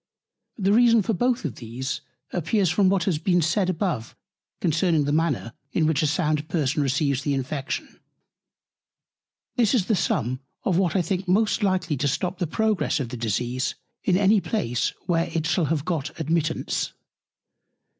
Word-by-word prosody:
The 200 -1 +2
reason 230 -1 +5
for 225 - 0
both 245 +5 +1
these 130 -2 -4 0.3
appears 180 +1 +1
from 190 +2 +3
what 190 -2 +2
has 170 -4 0
been 175 +2 +2
said 180 +4 +1
above 165 - -2 0.4
concerning 165 -1 +2
the 145 - -1
Manner, 150 -7 0 0.2
in 160 - +2
which 155 -3 +2
a 155 - +2
sound 155 -1 0
Person 150 -2 0
receives 140 0 +1
the 140 0 0
Infection. 135 +1 -4 1.6
This 235 0 +3
is 210 -7 +2
the 220 - +2
Sum 130 - 0 0.2
of 180 -2 +2
what 185 -2 +1
I 185 - +3
think 185 +3 -2
most 215 +5 +2
likely 185 -6 +1
to 145 - 0
stop 180 +6 -1
the 175 - 0
Progress 215 +1 +1
of 130 -4 -3
the 125 - -5
Disease 120 +3 -1 0.3
in 180 -2 +3
any 200 +1 +4
Place, 125 - -1
where 170 -2 +1
it 160 -1 0
shall 175 0 +2
have 150 -1 -1
got 165 -6 -3
Admittance. 160 0 -1
165 Hz, 165 wpm, -25 LUFS, 145-190 Hz, 1.6 s, reason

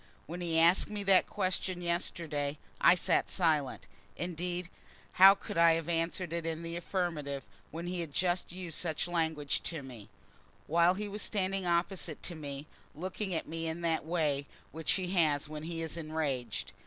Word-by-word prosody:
When 175 +3 -6
he 165 -2 0
asked 170 +3 +5
me 210 -1 -4
that 195 -1 +5
question 185 -1 -1
yesterday, 165 -4 -2 0.3
I - - +8
sat 180 - +1
silent. 150 - +1 0.3
Indeed, 175 0 -2 0.4
how 195 +2 +9
could 195 - -4
I 170 -1 +7
have 165 -1 -1
answered 170 +1 -1
it 170 -1 -1
in 165 0 -3
the 165 0 -4
affirmative, 165 -6 -2 0.2
when 165 +2 -6
he 180 0 -2
had 165 -3 -4
just 175 +3 0
used 175 -3 -5
such 160 -1 -1
language 160 -4 0
to 160 -5 -3
me, 115 -6 -10 0.6
while 170 +3 +4
he 210 +2 -3
was 205 +1 -3
standing 195 -2 0
opposite 170 -2 0
to 175 - -3
me, 145 -3 -6 0.3
looking 185 +5 -4
at - - -2
me 165 +1 -3
in 160 +2 -3
that 165 -1 +1
way 150 -4 0 0.2
which 160 0 0
he 185 -2 -1
has 155 -5 +2
when 150 0 -6
he 165 +1 -4
is 160 - -4
enraged? 140 - -2
165 Hz, 175 wpm, -32 LUFS, 155-180 Hz, 0.6 s, how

